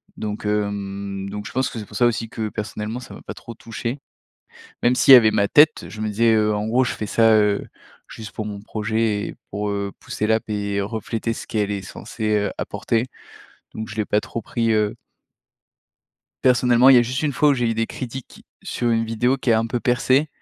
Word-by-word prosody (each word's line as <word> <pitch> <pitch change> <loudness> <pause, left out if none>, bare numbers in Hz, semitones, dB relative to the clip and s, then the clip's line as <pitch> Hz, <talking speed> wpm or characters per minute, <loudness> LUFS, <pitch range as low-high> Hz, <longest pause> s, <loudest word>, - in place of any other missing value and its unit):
donc, 105 0 -5
hem, 100 -1 -2
donc 105 +1 -6
je - - -9
pense 130 +1 0
que 115 - -7
c'est 105 - -7
pour - - -8
ça 120 - +4
aussi 115 -1 0
que 110 -1 -4
personnellement 105 +3 -5
ça 125 - -11
m'a - - -13
pas - - -7
trop 115 - -11
touché. 115 +4 -5 0.8
Même 120 +1 +4
s'il 130 +2 +7
y - - +13
avait 110 -3 +5
ma 100 -1 +1
tête, 155 +1 +5
je 110 - -10
me 110 - -1
disais, 115 +2 +3
heu, 105 -1 +2
en 105 +1 -2
gros 125 +3 +2
je - - -2
fais 105 - -5
ça, 115 +1 +4
heu, 105 -1 +2 0.4
juste 110 -1 -9
pour 110 - -5
mon 100 -1 -6
projet 110 0 -1
et - - -8
pour, 105 +1 -3
heu, 100 -1 -2
pousser 105 - -3
l'app 110 0 +1
et 100 -1 -1
refléter 110 +2 -3
ce - - -8
qu'elle 105 -2 -1
est 100 -1 -2
censée, 110 +3 -3
heu, 105 0 -1
apporter, 115 +2 -1 0.7
donc 110 0 -6
je 105 - -8
l'ai 105 - 0
pas 105 +1 +1
trop 115 - -5
pris, 115 0 -1
heu 105 -1 +1 1.5
Personnellement 125 0 +5
il 130 - +8
y - - +9
a - - +5
juste 125 +4 -3
une 150 -2 0
fois 150 +3 +3
où 145 - +4
j'ai 120 -3 0
eu - - +1
des 115 0 -1
critiques 130 +1 -8 0.2
sur 120 -1 -1
une 115 0 +1
vidéo 120 +4 +1
qui 125 - 0
a 110 - +5
un 115 - 0
peu 120 +1 -2
percé. 130 +5 +2
110 Hz, 225 wpm, -22 LUFS, 105-120 Hz, 1.5 s, y